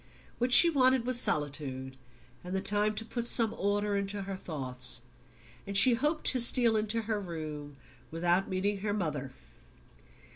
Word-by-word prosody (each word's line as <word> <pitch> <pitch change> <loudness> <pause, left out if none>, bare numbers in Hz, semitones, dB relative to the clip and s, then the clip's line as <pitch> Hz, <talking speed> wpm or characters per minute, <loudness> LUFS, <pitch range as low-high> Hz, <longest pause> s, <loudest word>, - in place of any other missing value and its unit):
What 245 +1 -2
she 340 - +9
wanted 260 -5 +1
was 250 -1 +2
solitude, 135 -3 -3 0.5
and 180 +1 -6
the - - -1
time 210 +2 0
to 225 - -4
put 235 +1 -5
some 225 -2 +2
order 205 +1 -2
into 200 0 -4
her 195 0 -7
thoughts; 130 -8 +1 0.6
and 200 0 0
she 250 +4 +7
hoped 295 +6 -3
to 255 - -1
steal 235 -1 +4
into 220 +1 -2
her 215 -1 -3
room 155 -6 -9 0.3
without 175 +3 -1
meeting 195 +2 -3
her 205 +1 -4
mother. 150 -9 -4
200 Hz, 155 wpm, -28 LUFS, 155-230 Hz, 0.6 s, she